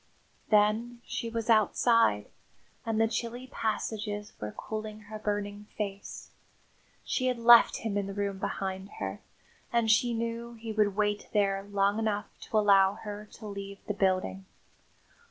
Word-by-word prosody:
Then 220 Hz, +3 st, +3 dB
she 230 Hz, -, -3 dB
was 230 Hz, -1 st, -3 dB
outside, 225 Hz, -, +4 dB, 0.6 s
and 220 Hz, -1 st, 0 dB
the 225 Hz, -, +4 dB
chilly 235 Hz, +2 st, -3 dB
passages 215 Hz, -4 st, -3 dB
were 105 Hz, 0 st, -4 dB
cooling 215 Hz, -, -6 dB
her 215 Hz, +1 st, -8 dB
burning 205 Hz, 0 st, -3 dB
face. 200 Hz, -2 st, -5 dB, 0.7 s
She 255 Hz, -, 0 dB
had 250 Hz, -1 st, +1 dB
left 235 Hz, 0 st, +7 dB
him 210 Hz, -3 st, -1 dB
in 200 Hz, -, -3 dB
the 195 Hz, -, -5 dB
room 200 Hz, -1 st, -2 dB
behind 190 Hz, 0 st, -3 dB
her; -, -, -4 dB, 0.5 s
and 235 Hz, -2 st, +3 dB
she 235 Hz, +2 st, +3 dB
knew 230 Hz, +1 st, -3 dB
he 225 Hz, 0 st, -6 dB
would 210 Hz, -2 st, +2 dB
wait 210 Hz, 0 st, 0 dB
there 195 Hz, -2 st, +2 dB
long 200 Hz, +1 st, +1 dB
enough 210 Hz, -2 st, 0 dB, 0.2 s
to 220 Hz, -, +1 dB
allow 200 Hz, -2 st, +5 dB
her 210 Hz, 0 st, -8 dB
to 220 Hz, -, -11 dB
leave 200 Hz, -1 st, -6 dB
the 210 Hz, -, -2 dB
building. 185 Hz, -, 0 dB
210 Hz, 150 wpm, -29 LUFS, 200-225 Hz, 0.7 s, left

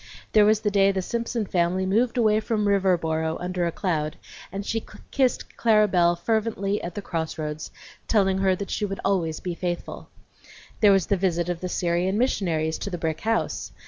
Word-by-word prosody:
There 210 Hz, -1 st, +6 dB
was 215 Hz, 0 st, +3 dB
the 210 Hz, -, 0 dB
day 195 Hz, 0 st, +4 dB
the 190 Hz, -1 st, -2 dB
Simpson 235 Hz, +1 st, -2 dB
family 180 Hz, 0 st, 0 dB
moved 230 Hz, +6 st, +1 dB
away 215 Hz, -2 st, +4 dB
from 215 Hz, -1 st, -1 dB
Riverboro 165 Hz, -5 st, +1 dB
under 180 Hz, -1 st, -1 dB
a -, -, -1 dB
cloud, 155 Hz, -5 st, -2 dB, 0.3 s
and 195 Hz, +2 st, -5 dB
she 225 Hz, +1 st, -2 dB, 0.3 s
kissed 260 Hz, -3 st, 0 dB
Clara 215 Hz, -2 st, +4 dB
Belle 175 Hz, -3 st, +3 dB
fervently 210 Hz, 0 st, -1 dB
at 175 Hz, 0 st, -6 dB
the 205 Hz, -, -5 dB
cross 160 Hz, -4 st, -3 dB
roads, 150 Hz, -1 st, -4 dB, 0.4 s
telling 195 Hz, -3 st, +2 dB
her 190 Hz, -1 st, +3 dB
that 200 Hz, +1 st, -6 dB
she -, -, -2 dB
would 195 Hz, -1 st, -3 dB
always 170 Hz, -5 st, 0 dB
be 180 Hz, -, -4 dB
faithful. 175 Hz, 0 st, -5 dB, 0.7 s
There 210 Hz, -2 st, +6 dB
was 195 Hz, -3 st, +3 dB
the 200 Hz, -, +1 dB
visit 175 Hz, -2 st, 0 dB
of 175 Hz, -1 st, -3 dB
the 180 Hz, -, -3 dB
Syrian 175 Hz, +3 st, 0 dB
missionaries 165 Hz, -10 st, 0 dB
to -, -, -4 dB
the 180 Hz, -, -4 dB
brick 160 Hz, -2 st, -3 dB
house. 225 Hz, +1 st, -1 dB
190 Hz, 190 wpm, -25 LUFS, 170-210 Hz, 0.7 s, There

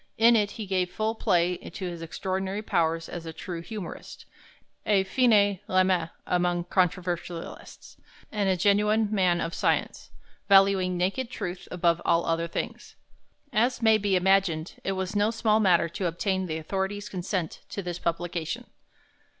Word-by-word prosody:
In 235 Hz, +1 st, +6 dB
it 210 Hz, -2 st, +2 dB
he 220 Hz, -, -4 dB
gave 185 Hz, -2 st, 0 dB
full 215 Hz, +3 st, -1 dB
play 180 Hz, -4 st, +1 dB
to 185 Hz, -, -8 dB
his 170 Hz, -2 st, -5 dB
extraordinary 190 Hz, +4 st, -3 dB
powers 165 Hz, -4 st, 0 dB
as 170 Hz, -2 st, -7 dB
a -, -, -4 dB
true 170 Hz, +1 st, -6 dB
humorist, 185 Hz, +1 st, -8 dB, 0.6 s
a 200 Hz, -2 st, +3 dB
fine 205 Hz, -3 st, +3 dB
lame 185 Hz, -3 st, +2 dB, 0.2 s
among 175 Hz, -1 st, +1 dB
controversialists, 175 Hz, -1 st, -3 dB, 0.3 s
and 205 Hz, -2 st, 0 dB
a 185 Hz, -, +2 dB
genuine 210 Hz, +3 st, +3 dB
man 180 Hz, -4 st, +2 dB
of 165 Hz, 0 st, -3 dB
science, -, -, -1 dB, 0.4 s
valuing 195 Hz, -2 st, +5 dB
naked 195 Hz, +8 st, -1 dB
truth 180 Hz, -7 st, -6 dB
above 170 Hz, -1 st, +1 dB
all 170 Hz, 0 st, +2 dB
other 165 Hz, 0 st, 0 dB
things. -, -, -5 dB, 0.6 s
As 240 Hz, +2 st, +1 dB
may 220 Hz, -1 st, +5 dB
be 200 Hz, -2 st, +1 dB
imagined, 180 Hz, -3 st, +2 dB
it 195 Hz, -, -1 dB
was 190 Hz, +1 st, -3 dB
no 205 Hz, +1 st, +3 dB
small 220 Hz, -1 st, +2 dB
matter 180 Hz, -5 st, +4 dB
to 180 Hz, +2 st, -2 dB
obtain 190 Hz, +2 st, -1 dB
the 160 Hz, -1 st, -3 dB
authorities' 195 Hz, +5 st, -3 dB
consent 180 Hz, -3 st, -3 dB
to 200 Hz, -, -5 dB
this 175 Hz, -1 st, -4 dB
publication. 170 Hz, +6 st, -3 dB
185 Hz, 150 wpm, -27 LUFS, 175-205 Hz, 0.6 s, In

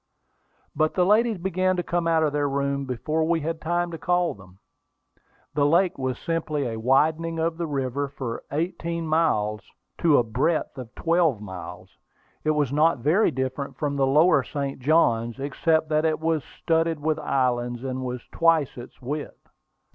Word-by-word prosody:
But 155 Hz, 0 st, +1 dB
the 180 Hz, -, +3 dB
ladies 220 Hz, +2 st, +3 dB
began 185 Hz, +1 st, 0 dB
to 175 Hz, -, -1 dB
come 170 Hz, 0 st, -1 dB
out 165 Hz, -1 st, +3 dB
of 150 Hz, -2 st, +1 dB
their 145 Hz, -1 st, +1 dB
room 140 Hz, 0 st, -1 dB
before 150 Hz, +5 st, -1 dB
we 165 Hz, 0 st, +1 dB
had 165 Hz, +2 st, -3 dB
time 175 Hz, +1 st, -1 dB
to 165 Hz, -, -6 dB
call 175 Hz, -1 st, +1 dB
them. 95 Hz, -2 st, -17 dB, 1.0 s
The 145 Hz, 0 st, +2 dB
lake 175 Hz, +4 st, +3 dB
was 130 Hz, -1 st, -2 dB
simply 155 Hz, -4 st, -2 dB
a 115 Hz, -2 st, -3 dB
widening 155 Hz, +7 st, +2 dB
of 165 Hz, 0 st, 0 dB
the 170 Hz, -1 st, -2 dB
river 140 Hz, -1 st, -2 dB
for 130 Hz, -4 st, -6 dB
eighteen 170 Hz, +2 st, -2 dB
miles 110 Hz, -10 st, +1 dB, 0.4 s
to 160 Hz, -4 st, +4 dB
a -, -, +4 dB
breadth 135 Hz, +9 st, -1 dB
of 125 Hz, -3 st, -7 dB
twelve 165 Hz, -7 st, +2 dB
miles. 90 Hz, -2 st, -9 dB, 0.4 s
It 155 Hz, -, 0 dB
was 145 Hz, -3 st, +1 dB
not 155 Hz, +2 st, +3 dB
very 155 Hz, -, +3 dB
different 130 Hz, +2 st, -4 dB
from 145 Hz, -1 st, -2 dB
the 135 Hz, -1 st, +2 dB
lower 150 Hz, +2 st, +5 dB
St. 140 Hz, +1 st, -4 dB
Johns, 120 Hz, -5 st, +2 dB
except 160 Hz, +3 st, 0 dB
that 155 Hz, 0 st, +2 dB
it 160 Hz, -1 st, +1 dB
was 160 Hz, -1 st, 0 dB
studded 165 Hz, -1 st, -1 dB
with 155 Hz, +1 st, 0 dB
islands, 120 Hz, -3 st, 0 dB
and 130 Hz, -1 st, -3 dB
was 125 Hz, -1 st, -4 dB
twice 165 Hz, -6 st, +2 dB
its 120 Hz, +1 st, -12 dB
width. 145 Hz, +4 st, -6 dB
150 Hz, 170 wpm, -25 LUFS, 130-165 Hz, 1.0 s, lower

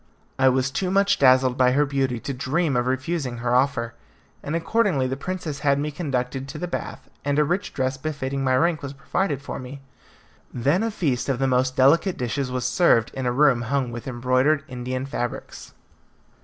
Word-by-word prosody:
I 130 Hz, 0 st, +6 dB
was 130 Hz, 0 st, +1 dB
too 180 Hz, +8 st, -1 dB
much 195 Hz, +1 st, +2 dB
dazzled 130 Hz, -1 st, +4 dB
by 125 Hz, 0 st, +4 dB
her 145 Hz, +2 st, +3 dB
beauty 135 Hz, -3 st, -1 dB
to 140 Hz, -, -4 dB
dream 145 Hz, +3 st, 0 dB
of 120 Hz, 0 st, +1 dB
refusing 130 Hz, -1 st, -2 dB
her 120 Hz, +1 st, -1 dB
offer, 125 Hz, -3 st, +1 dB, 0.5 s
and 150 Hz, -, -3 dB
accordingly 165 Hz, -, +1 dB
the 130 Hz, +1 st, -2 dB
princess 160 Hz, -1 st, -5 dB
had 140 Hz, -1 st, +2 dB
me 150 Hz, +1 st, -2 dB
conducted 135 Hz, -4 st, -3 dB
to 140 Hz, -, -7 dB
the 180 Hz, -, -4 dB
bath, -, -, -6 dB, 0.2 s
and 145 Hz, 0 st, 0 dB
a 150 Hz, -, +5 dB
rich 175 Hz, +7 st, -1 dB
dress 130 Hz, 0 st, -1 dB
befitting 140 Hz, -2 st, -3 dB
my 130 Hz, -1 st, +2 dB
rank 165 Hz, 0 st, +1 dB
was 140 Hz, -1 st, -6 dB
provided 140 Hz, +1 st, -2 dB
for -, -, -5 dB
me. 130 Hz, +2 st, -8 dB, 0.7 s
Then 140 Hz, -, +1 dB
a 225 Hz, -, 0 dB
feast 145 Hz, -, -1 dB
of 135 Hz, -, +1 dB
the 135 Hz, -, 0 dB
most 130 Hz, 0 st, +1 dB
delicate 165 Hz, +8 st, +4 dB
dishes 125 Hz, +2 st, -2 dB
was 125 Hz, -1 st, -2 dB
served 125 Hz, -4 st, +3 dB
in 130 Hz, -1 st, -3 dB
a -, -, +2 dB
room 135 Hz, -2 st, +3 dB
hung 125 Hz, +1 st, -1 dB
with 120 Hz, +1 st, -7 dB
embroidered 130 Hz, +4 st, +1 dB
Indian 130 Hz, +1 st, -4 dB
fabrics. 120 Hz, -3 st, -6 dB
135 Hz, 195 wpm, -24 LUFS, 125-150 Hz, 0.7 s, I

